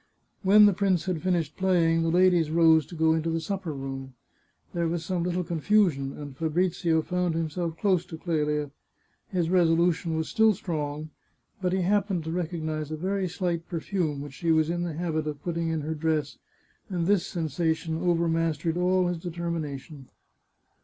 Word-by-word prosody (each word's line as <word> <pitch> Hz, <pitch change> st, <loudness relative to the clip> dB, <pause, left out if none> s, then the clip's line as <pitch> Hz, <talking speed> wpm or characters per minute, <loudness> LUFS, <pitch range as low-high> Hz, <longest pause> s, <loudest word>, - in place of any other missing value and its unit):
When 210 Hz, +2 st, +7 dB
the 205 Hz, -, +5 dB
prince 190 Hz, -3 st, +1 dB
had 180 Hz, -4 st, -2 dB
finished 170 Hz, -5 st, 0 dB
playing, 170 Hz, -3 st, +3 dB
the 165 Hz, -, +1 dB
ladies 175 Hz, -2 st, +4 dB
rose 160 Hz, -2 st, +4 dB
to 175 Hz, -, -10 dB
go 160 Hz, 0 st, +3 dB
into 160 Hz, +1 st, 0 dB
the 165 Hz, 0 st, 0 dB
supper 185 Hz, 0 st, -4 dB
room. 135 Hz, -2 st, -6 dB, 0.6 s
There 170 Hz, -1 st, 0 dB
was 165 Hz, 0 st, -2 dB
some 180 Hz, -1 st, -1 dB
little 180 Hz, +1 st, -1 dB
confusion, 170 Hz, -5 st, +1 dB
and 145 Hz, -2 st, -8 dB
Fabrizio 165 Hz, +1 st, +1 dB
found 180 Hz, -1 st, -1 dB
himself 165 Hz, +1 st, -2 dB
close 185 Hz, -5 st, +2 dB
to 160 Hz, -, -7 dB
Clelia. 150 Hz, -3 st, -1 dB, 0.6 s
His 175 Hz, -3 st, -1 dB
resolution 170 Hz, -1 st, +2 dB
was 160 Hz, -, -1 dB
still 220 Hz, -1 st, +3 dB
strong, 155 Hz, -5 st, -4 dB, 0.5 s
but 180 Hz, -1 st, 0 dB
he 190 Hz, 0 st, +1 dB
happened 200 Hz, -2 st, +1 dB
to 160 Hz, -, -4 dB
recognise 160 Hz, -3 st, -3 dB
a 155 Hz, -, -4 dB
very 190 Hz, +3 st, -1 dB
slight 175 Hz, -2 st, -2 dB
perfume 165 Hz, -4 st, -2 dB
which 145 Hz, -1 st, -8 dB
she 165 Hz, +4 st, -1 dB
was 160 Hz, 0 st, +3 dB
in 175 Hz, 0 st, -2 dB
the 175 Hz, -2 st, -2 dB
habit 160 Hz, -1 st, -2 dB
of 145 Hz, -2 st, -5 dB
putting 170 Hz, -1 st, -2 dB
in 160 Hz, -1 st, -1 dB
her 155 Hz, +2 st, -3 dB
dress, 155 Hz, -2 st, -1 dB, 0.5 s
and 175 Hz, -3 st, -1 dB
this 200 Hz, -1 st, +2 dB
sensation 160 Hz, 0 st, -1 dB
overmastered 165 Hz, -2 st, +1 dB
all 180 Hz, +1 st, +2 dB
his 175 Hz, -1 st, -1 dB
determination. 160 Hz, -5 st, -5 dB
165 Hz, 170 wpm, -27 LUFS, 155-180 Hz, 0.6 s, When